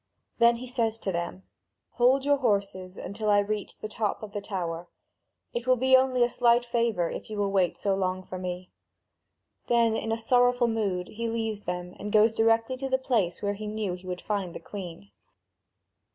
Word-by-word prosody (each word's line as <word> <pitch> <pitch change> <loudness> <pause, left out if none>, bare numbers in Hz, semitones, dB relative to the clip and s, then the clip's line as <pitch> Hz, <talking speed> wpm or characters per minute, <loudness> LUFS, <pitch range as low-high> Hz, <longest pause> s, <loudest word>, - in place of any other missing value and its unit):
Then 235 0 +6
he 240 +2 -7
says 230 -3 0
to 195 - -3
them: 170 - -4 0.5
"Hold 255 +3 +3
in 285 - -2
your 285 - +5
horses 200 -6 -1
until 215 +2 -3
I 205 - +5
reach 205 0 -2
the - - -6
top 215 0 -2
of 210 - -7
the 205 -1 -4
tower. 175 -4 -4 0.6
It 240 +1 -4
will 255 - +5
be 260 +1 +4
only 260 -1 +4
a - - +4
slight 240 0 +3
favour, 230 -7 0
if - - -7
you 215 - -5
will 200 -1 0
wait 190 -3 +2
so 200 - 0
long 185 -1 -1
for 185 0 -7
me." 180 0 -5 1.0
Then 235 -2 +3
in 225 0 -1
sorrowful 245 +1 +3
mood 200 -5 -1
he 230 +1 -3
leaves 225 -2 -3
them 180 0 -4
and 210 - -5
goes 215 +1 +5
directly 225 +3 +2
to 270 +1 -4
the 260 - +3
place 225 -10 0
where 205 0 +1
he 210 +1 -6
knew 210 -3 -2
he 180 +1 -9
would 180 -1 -4
find 195 -5 -3
the - - -5
Queen. 170 - -9
215 Hz, 195 wpm, -27 LUFS, 185-235 Hz, 1.0 s, Then